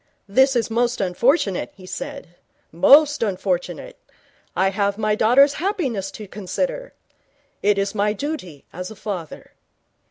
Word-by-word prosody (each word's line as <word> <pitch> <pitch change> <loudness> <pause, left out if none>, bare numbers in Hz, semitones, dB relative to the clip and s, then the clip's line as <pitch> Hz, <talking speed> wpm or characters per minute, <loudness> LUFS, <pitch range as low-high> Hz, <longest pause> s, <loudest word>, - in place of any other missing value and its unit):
'This 265 +6 +3
is 230 -2 0
most 240 +2 0
unfortunate,' 195 - +1
he 185 - -14
said. 275 - -7 0.4
'Most 285 - +5
unfortunate. 185 -5 -2 0.6
I 190 +1 +2
have 200 0 0
my 215 -1 +1
daughter's 255 +7 +5
happiness 275 - -1
to 210 -2 -9
consider. - - -4 0.7
It 205 0 +2
is 200 0 -1
my 210 0 +1
duty 210 - -6
as 180 +2 -6
a 220 - -10
father.' 185 -7 -7
210 Hz, 130 wpm, -22 LUFS, 190-270 Hz, 0.7 s, Most